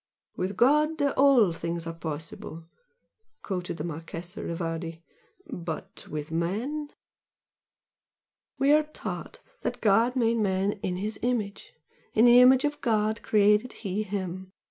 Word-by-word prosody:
"With 185 +1 -3
God 300 +6 +3
all 275 - +4
things 170 0 -4
are 165 - -4
possible!" 160 0 -7 0.8
quoted 180 -3 -4
the 150 - -4
Marchese 170 +4 -6
Rivardi 165 0 -4 0.4
"But 170 - -7
with 150 +1 -5
man 225 - -2 0.9
" - - -67
"We 275 +1 +3
are 305 +1 +6
taught 305 0 -7 0.2
that - - -3
God 225 +4 +3
made 235 -2 +2
man 195 -2 +1
'in 180 - -2
His 205 +3 -4
image. 225 -5 -2 0.4
In 225 - +6
the 245 +1 +8
image 260 +2 +6
of 295 0 -2
God 220 -2 +1
created 210 +3 +3
He 195 +2 -1
him.' 190 -2 -5
200 Hz, 130 wpm, -27 LUFS, 170-245 Hz, 0.9 s, the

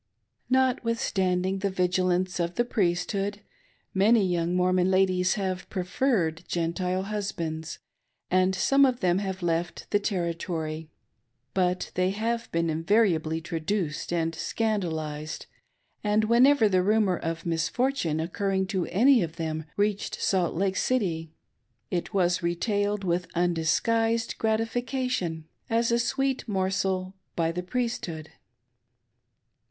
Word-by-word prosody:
Notwithstanding 205 -7 +1
the 200 0 0
vigilance 185 0 +1
of 170 0 -1
the 240 - +1
Priesthood, 195 0 -1 0.5
many 205 +2 +4
young 175 -1 0
Mormon 180 0 +3
ladies 185 -1 +3
have 190 -2 -3
preferred 180 -3 0
Gentile 180 +2 -1
husbands, 170 -6 -4 0.5
and 185 +1 +3
some 275 +8 +4
of 255 -2 +2
them 180 0 +2
have 190 -2 -4
left 170 0 -1
the 205 - +3
Territory; 170 -5 -3 0.6
but 180 -1 0
they 185 0 +1
have 230 +4 -2
been 170 0 +1
invariably 165 -1 +2
traduced 165 0 -2
and 165 -1 0
scandalised, 160 -7 -2 0.6
and 210 +1 +2
whenever 235 +2 +5
the 185 -2 +3
rumor 205 -2 +2
of 165 0 -4
misfortune 170 - 0
occurring 190 +3 -1
to 190 -2 -2
any 240 +6 +5
of 165 -2 -3
them 160 -2 -3
reached 205 0 0
Salt 180 -4 +1
Lake 190 +2 0
City, 170 -11 0 0.6
it 175 -2 -2
was 180 -2 +2
retailed 205 +4 0
with 180 0 -1
undisgliised 225 +7 +1
gratification, 225 - -1 0.2
as 230 0 +2
a 235 - +3
sweet 265 +2 0
morsel, 190 -1 -1 0.2
by 165 -1 +1
the 180 +2 -3
Priesthood. 180 -7 -3
185 Hz, 115 wpm, -27 LUFS, 170-215 Hz, 0.6 s, whenever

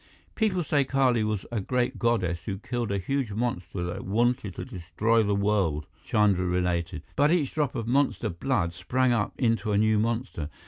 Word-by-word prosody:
"People 200 -6 +1
say 145 -2 +2
Kali 130 -4 +2
was 105 -3 -2
a 115 - -1
great 125 +5 -1
goddess 100 -8 +1
who 95 - -2
killed 120 0 -3
a 100 - +1
huge 130 +2 -2
monster 100 -6 -2
that 85 0 -4
wanted 110 -1 0
to - - -5
destroy 110 +2 0
the 100 -1 +1
world," 100 -7 +1 0.2
Chandra 100 -4 +2
related. 90 -2 -1
"But 145 +1 +4
each 160 -5 +1
drop 150 -5 0
of 115 - -2
monster 130 -2 +1
blood 85 -1 -1
sprang 130 +8 +1
up 110 -3 0
into 115 -4 +1
a - - +3
new 110 0 +3
monster. 115 - -2
110 Hz, 180 wpm, -27 LUFS, 95-125 Hz, 0.2 s, But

